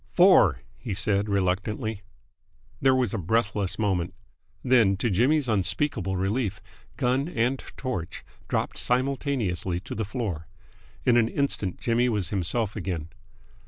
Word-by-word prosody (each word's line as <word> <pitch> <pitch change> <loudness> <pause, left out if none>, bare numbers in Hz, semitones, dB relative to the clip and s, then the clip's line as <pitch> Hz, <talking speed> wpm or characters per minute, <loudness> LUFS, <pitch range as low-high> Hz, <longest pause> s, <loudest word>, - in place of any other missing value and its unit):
"Four!" 175 - +5 0.2
he 105 -5 -4
said 100 +1 +1
reluctantly. 100 +3 -1 0.8
There 135 -1 +4
was 130 -2 0
a 110 - -1
breathless 100 +1 0
moment. 95 -4 -1 0.5
Then, 115 -7 +4
to 115 +3 0
Jimmy's 130 - +2
unspeakable 100 -1 +1
relief, 105 +2 -1 0.4
gun 130 +2 +1
and 125 -2 0 0.2
torch 95 -10 -5 0.2
dropped - - -1
simultaneously 125 - 0
to - - -7
the 110 - -2
floor. 100 - -4 0.6
In 120 -1 +5
an 115 -2 +4
instant 115 -9 -1
Jimmy 120 +1 +1
was 105 -7 -1
himself 100 +3 0
again. 90 -6 -4
110 Hz, 125 wpm, -26 LUFS, 95-125 Hz, 0.8 s, Four